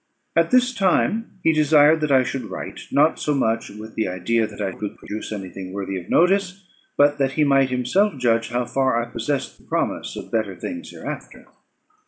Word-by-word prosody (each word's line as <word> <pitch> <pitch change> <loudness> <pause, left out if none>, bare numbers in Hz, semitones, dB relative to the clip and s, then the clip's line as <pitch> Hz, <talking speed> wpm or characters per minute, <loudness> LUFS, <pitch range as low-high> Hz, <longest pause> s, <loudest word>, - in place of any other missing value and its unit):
At - - +3
this 255 0 +3
time 215 +2 +1
he 160 - +4
desired 155 0 +5
that 150 -2 0
I 130 -1 +5
should 130 -1 -4
write, - - -7
not 150 +3 +3
so 150 - 0
much 115 -4 0
with 110 +1 -10
the 110 - -1
idea 100 +5 0
that - - -12
I 100 -2 -1
could 105 +2 -6
produce 110 +1 -7
any 95 -3 -5
thing 95 0 -8
worthy 95 -1 -4
of 90 -1 -8
notice, 190 +1 +2 0.3
but 145 0 +4
that 135 -1 +1
he 150 - +2
might 135 -2 +4
himself 130 +10 +1
judge 115 -2 +1
how 120 0 -1
far 130 -1 +1
I 120 0 -4
possessed 135 +4 -3
the - - -22
promise - - -2
of - - -8
better 110 -4 -1
things 260 0 -6
hereafter. - - -8
130 Hz, 200 wpm, -22 LUFS, 110-155 Hz, 0.3 s, desired